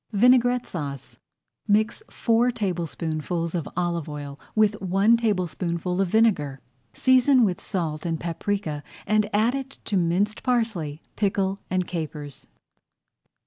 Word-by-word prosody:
VINAIGRETTE 245 +3 +4
SAUCE 140 -6 -6 0.5
Mix 215 - +2
four 235 +1 +2
tablespoonfuls 170 -5 -2
of 170 -4 -2
olive 170 -3 -1
oil 145 -1 -7 0.2
with 215 -1 +3
one 195 +5 +4
tablespoonful 180 -4 -1
of 195 - +2
vinegar. 175 -10 +2 0.3
Season 260 - +4
with 185 -3 -1
salt 160 -5 -3
and 165 -2 -2
paprika 170 -2 -2 0.2
and 215 -1 +2
add 245 +6 +1 0.2
to 205 - -2
it - - +4
minced 185 +5 0
parsley, 215 - -1
pickle, 195 -1 0
and 185 0 0
capers. 155 -4 -6
185 Hz, 120 wpm, -25 LUFS, 165-220 Hz, 0.5 s, VINAIGRETTE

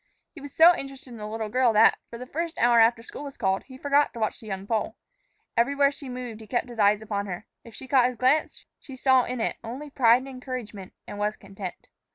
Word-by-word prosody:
He 315 - -13
was 285 0 -9
so 335 +5 +7
interested 275 -2 -8
in 235 - -9
the 210 -1 -6
little 220 0 -4
girl 250 0 +3
that, 220 +1 +5
for 235 - -8
the 250 - -8
first 330 +5 -4
hour 235 0 +4
after 230 0 +4
school 280 - -9
was 280 -1 -9
called, 190 -3 0
he 260 -1 -12
forgot 285 +2 +2
to 235 - -8
watch 215 - -1
the 220 - -12
young 195 -1 -5
Pole. 220 0 -2 0.6
Everywhere 280 +4 +3
she 280 -1 -10
moved, 245 -3 -7
he 220 - -12
kept 245 +1 -1
his 235 -2 -10
eyes 205 +1 +3
upon 205 -2 -3
her. 180 +3 -6 0.2
If 230 - -14
she 265 - -9
caught 255 -2 +4
his 250 -1 -5
glance, 260 +6 +1
she 270 - -11
saw 260 -1 +3
in 250 0 -4
it 225 - -1
only 265 +6 -7
pride 235 -4 +5
and 260 +2 -8
encouragement 250 -7 -7
and 205 - -8
was 210 +1 0
content. 195 -2 -9
240 Hz, 240 wpm, -26 LUFS, 215-265 Hz, 0.6 s, so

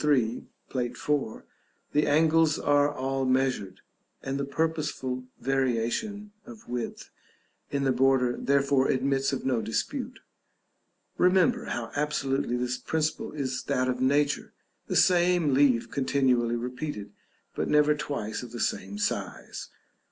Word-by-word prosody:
3, 125 -6 +1 0.2
Plate 125 -2 -2
IV., 145 -7 -2 0.5
the 150 +1 +2
angles 160 +1 +4
are 145 0 +3
all 135 -1 -2
measured, 130 -7 0 0.4
and 135 +1 -2
the - - 0
purposeful 140 -4 -2
variation 135 - -1
of 230 -1 -13
width 120 -1 -5 0.6
in 140 -1 -1
the 135 - +3
border 125 -1 +3
therefore 140 -1 +2
admits 135 +1 +1
of 135 - -3
no 125 -4 +1
dispute. 110 +1 -3 1.0
Remember 190 +7 +3
how 115 -1 -4
absolutely 135 -4 0
this 125 0 -2
principle 160 -1 -2
is 130 -3 -2
that 130 -2 +1
of 125 0 -1
nature; 145 +2 +1 0.3
the - - -2
same 175 -4 +4
leaf 130 -4 +3
continually 130 -4 +2
repeated, 125 -3 -5 0.4
but - - -2
never 150 0 +5
twice 140 -7 -4
of 125 -2 -9
the 120 - -7
same 100 -1 -2
size. 105 - -3
135 Hz, 130 wpm, -28 LUFS, 125-150 Hz, 1.0 s, never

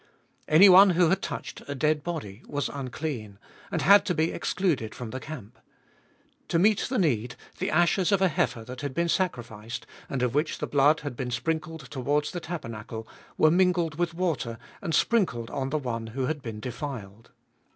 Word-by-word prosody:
Anyone 190 +4 +8
who 175 -2 +4
had 190 - +1
touched - - -5
a 145 - -4
dead 150 +2 +1
body 125 - -5
was 145 0 -2
unclean, 130 -6 -5 0.3
and - - -1
had 200 +1 +7
to 180 - +1
be 160 +1 +1
excluded 145 - -1
from 120 -3 -6
the 130 - -4
camp. 125 -7 -9 0.9
To - - +1
meet 205 +4 +3
the 255 - 0
need, 125 - +1 0.2
the - - -1
ashes 175 +4 +3
of 200 - +4
a 190 - +4
heifer 160 -8 -1
that 125 +2 -8
had 140 -3 -4
been 170 0 +1
sacrificed, 120 - -2 0.2
and 130 -2 -1
of 125 - 0
which 150 +3 0
the - - -3
blood 145 +2 +3
had 145 -4 -5
been 125 0 -3
sprinkled 160 +5 -2
towards 145 +2 0
the 175 - -4
tabernacle, 115 -9 -6 0.3
were 155 - +5
mingled 175 -2 +2
with 170 -1 0
water, 160 -10 -1 0.2
and 165 - -1
sprinkled 150 - +1
on 135 -1 -2
the 155 - 0
one 115 -5 -3
who 130 +4 -3
had 150 +1 -2
been 110 -4 -6
defiled. 115 -4 -7
145 Hz, 180 wpm, -27 LUFS, 120-170 Hz, 0.9 s, Anyone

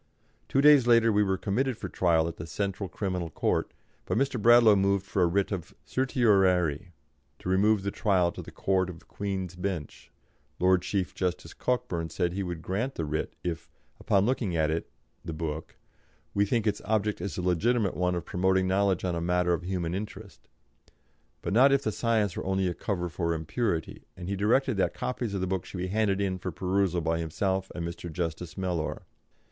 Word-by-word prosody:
Two 135 - +3
days 145 -4 +7
later 115 -1 +5
we 105 0 +3
were 95 -2 +1
committed 120 +6 -1
for - - -5
trial 85 -3 +2
at 85 - -6
the 80 - -7
Central 100 +3 -3
Criminal 90 -2 -3
Court, - - 0 0.4
but - - 0
Mr. 135 -3 0
Bradlaugh 115 -1 +7
moved 100 0 +2
for 100 - -1
a 90 - +5
writ 100 +4 0
of 90 -5 -5
certiorari 95 - +2 0.5
to - - -9
remove 100 +2 +3
the 100 - -1
trial 95 -6 +2
to - - -8
the - - -10
Court 95 -1 0
of 85 -2 -11
Queen's 95 -3 -4
Bench; 90 -5 -5 0.5
Lord 90 0 +4
Chief 95 -2 -2
Justice 90 -1 -3
Cockburn 120 -10 -2
said 85 +2 -1
he 100 - -2
would 85 -3 -4
grant 110 - -2
the 80 - -2
writ 75 +1 -3
if 85 -3 -4 0.3
"upon 100 0 +2
looking 115 -7 0
at 80 -1 +2
it 80 +1 -2 0.3
(the 80 - -5
book), 80 -1 -5 0.6
we 100 0 +3
think 115 0 +1
its 105 - 0
object 105 0 0
is 100 - -4
the 90 - -3
legitimate 100 +4 +1
one 90 0 +1
of 85 - -4
promoting 95 0 +1
knowledge 95 -1 +1
on 90 - 0
a 85 - -2
matter 90 0 +2
of 85 - -1
human 90 -2 -2
interest," 105 +3 -7 1.0
but - - -2
not 130 +5 +6
if 140 0 +3
the 110 - 0
science 110 -3 0
were - - -4
only 95 0 +1
a 90 - -1
cover 90 -1 -2
for 85 0 -1
impurity, 80 +2 -2
and 90 -1 -7
he 100 - -1
directed 115 +4 +2
that 95 - +1
copies 120 -5 -3
of 95 - -2
the - - +1
book 95 -1 -2
should - - -9
be 90 +1 -3
handed 100 -1 +1
in 95 -2 -1
for 90 - -4
perusal 90 0 0
by 80 0 0
himself 95 +4 -1
and 85 -1 -3
Mr. 85 0 -7
Justice 85 +1 -4
Mellor. 90 -4 -2
95 Hz, 195 wpm, -28 LUFS, 85-105 Hz, 1.0 s, days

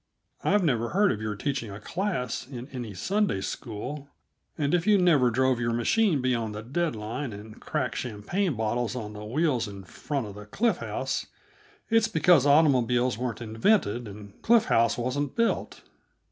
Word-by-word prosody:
I've 205 -2 +3
never 120 -7 +1
heard 200 +2 +3
of 105 - -3
your 105 -1 -3
teaching 130 +1 -3
a 100 +1 -8
class 130 - -3
in 125 -2 -8
any 120 -7 -6
Sunday 200 - 0
school, 130 +8 -6 0.5
and 145 0 0
if 175 +1 +1
you 210 -1 +6
never 160 -9 +4
drove 130 +1 +2
your 115 -1 0
machine 150 - +2
beyond 115 -4 0
the 105 - -6
dead 155 +4 -1
line 115 +5 -4
and 105 +2 -11
cracked - - -2
champagne 130 - -2
bottles 115 +2 -1
on 105 -4 -5
the 105 0 -8
wheels 125 0 0
in 100 -1 -9
front 135 +7 -4
of 105 - -8
the 105 +1 -11
Cliff 225 - +1
House, - - -3 0.6
it's 225 -1 +4
because 165 - +4
automobiles 125 -5 +3
weren't 125 -2 -3
invented 115 - +1
and 100 0 -11
Cliff 230 -1 +4
House 115 0 +2
wasn't 130 +4 -2
built. 230 0 -1
125 Hz, 170 wpm, -27 LUFS, 110-160 Hz, 0.6 s, you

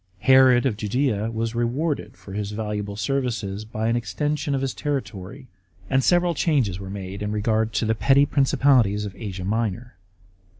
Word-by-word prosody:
Herod 130 +1 +6
of 115 -6 0
Judea 110 0 0
was 115 0 -3
rewarded 130 +7 -2
for 95 - -11
his 105 0 -3
valuable 105 -1 -4
services 110 -3 -2
by 110 0 -3
an 115 - +2
extension 140 +7 -1
of 135 - -1
his 135 -1 -2
territory, 130 -3 -5 0.4
and 135 0 +3
several 175 +2 +3
changes 130 - +1
were 95 -1 -7
made 95 0 -6
in 105 0 -2
regard 110 +1 0
to 110 +2 0
the 110 - +2
petty 135 +5 +4
principalities 130 -7 +3
of 100 - -7
Asia 95 -4 -6
Minor. 110 +2 -2
115 Hz, 165 wpm, -23 LUFS, 105-135 Hz, 0.4 s, Herod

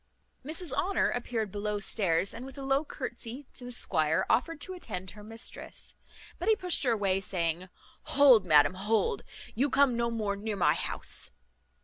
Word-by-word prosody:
Mrs 315 +1 -3
Honour 350 +8 +1
appeared 230 -4 -2
below 210 0 -2
stairs, 195 -3 +1
and 230 - -7
with 270 0 -10
a 275 - -6
low 270 +2 +2
curtesy 255 -1 -7
to 250 - -7
the 245 - -6
squire 160 -9 +1
offered 290 +7 +1
to 375 - -3
attend 190 - -6
her 210 - -12
mistress; 225 +2 -7 0.5
but 355 +5 0
he 440 - +6
pushed 365 -4 +1
her 240 - +3
away, 195 -3 +1
saying, 180 -1 -2 0.5
"Hold, 260 -7 +8
madam, 150 -2 +5
hold, 205 +1 0 0.3
you 270 +6 +1
come 270 -2 +4
no 235 0 0
more 215 -3 -1
near 210 +1 -3
my 195 - +4
house." - - -2
225 Hz, 170 wpm, -30 LUFS, 195-270 Hz, 0.5 s, Hold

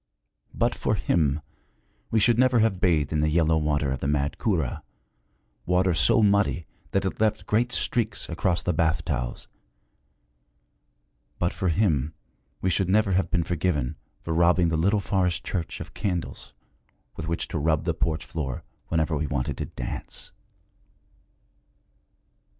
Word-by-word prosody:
But - - +1
for - - 0
him 75 -2 +1 0.7
we 110 - +2
should 120 +2 +3
never 130 -1 +4
have 110 -4 +2
bathed 80 -5 +2
in 75 - +1
the 75 +1 +2
yellow 80 0 +3
water 75 -3 0
of 65 - -2
the 70 - -2
mad 70 -1 0
Kura, 85 - 0 0.9
water 90 +1 +3
so 110 +6 +4
muddy 100 -4 +2 0.2
that 95 0 0
it 95 - -3
left 110 0 +1
great 120 +3 +1
streaks 115 -4 0
across 85 +1 0
the 90 - 0
bath 80 0 +1
towels; - - -3 1.9
but 85 - 0
for 95 - -1
him 80 -6 +1 0.5
we 95 - +1
should 95 0 +1
never 105 +1 +3
have 95 +1 +1
been 85 -2 +1
forgiven 80 -5 -1 0.3
for 80 - -2
robbing 85 +1 +4
the 80 - 0
little 100 +6 +2
forest 90 -4 0
church 85 -4 -3
of - - -8
candles 90 -5 -4 0.6
with 80 - -5
which 85 0 -1
to 80 - -2
rub 80 +1 +1
the - - 0
porch 80 0 -1
floor 70 -7 -4 0.2
whenever 80 -1 0
we 75 +1 -1
wanted 65 -2 -2
to - - -3
dance. - - -5
85 Hz, 150 wpm, -26 LUFS, 75-95 Hz, 1.9 s, never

